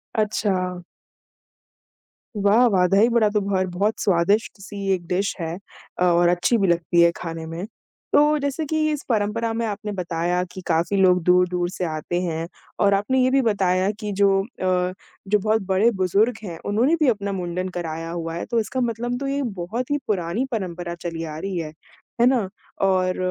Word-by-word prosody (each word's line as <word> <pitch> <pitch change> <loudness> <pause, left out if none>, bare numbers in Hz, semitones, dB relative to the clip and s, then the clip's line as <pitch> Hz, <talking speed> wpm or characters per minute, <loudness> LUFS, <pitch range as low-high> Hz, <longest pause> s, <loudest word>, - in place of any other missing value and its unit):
अच्छा। 190 -4 0 1.5
वाह 205 +4 +4
वाह! 185 -5 +3
दही-बड़ा 220 +3 +4
तो 210 0 0
भर 195 -1 0
बहुत 200 +5 -1
स्वादिष्ट-सी 200 +2 0
एक 175 -2 -3
डिश 190 +3 -1
है 165 0 -3 0.4
अ, - - +2
और 175 0 +4
अच्छी 180 +7 +2
भी 200 -3 +2
लगती 170 0 +2
है 170 0 +6
खाने 165 -1 -6
में। 165 +3 -5 0.5
तो 300 +1 +5
जैसे 285 +2 -2
कि 310 +1 0
इस 295 -2 -3
परंपरा 225 +1 0
में 230 +1 -1
आपने 210 0 -4
बताया 175 -1 -1
कि 185 - -8
काफ़ी 170 +4 +1
लोग 180 -2 +4
दूर-दूर 180 0 +2
से 185 -1 -3
आते 160 +2 -2
हैं 165 -2 -3 0.3
और 200 0 +4
आपने 210 +7 +1
ये 255 - +3
भी 275 - +4
बताया 190 -4 +1
कि 210 -2 -4
जो 200 0 +3
अ, 185 -4 -1 0.3
जो 210 +2 +3
बहुत 215 +2 +1
बड़े-बुज़ुर्ग 195 +2 +2
हैं, 170 -4 -6
उन्होंने 235 +10 +2
भी 305 - +3
अपना 200 -3 -1
मुंडन 180 0 -3
कराया 165 -1 -4
हुआ 165 -1 -4
है 170 - -4
तो 235 - 0
इसका 255 +4 -2
मतलब 240 +1 -2
तो 275 - -3
ये 280 +1 -1 0.2
बहुत 235 +10 -4
ही 290 - +2
पुरानी 190 +4 -1
परंपरा 175 -5 -4
चली 170 -1 -5
आ 155 -1 -6
रही 195 +2 -4
है, 155 -2 -4 0.5
है - - +6
ना? 250 -6 +2 0.3
और 185 -1 +2
195 Hz, 180 wpm, -23 LUFS, 175-220 Hz, 1.5 s, है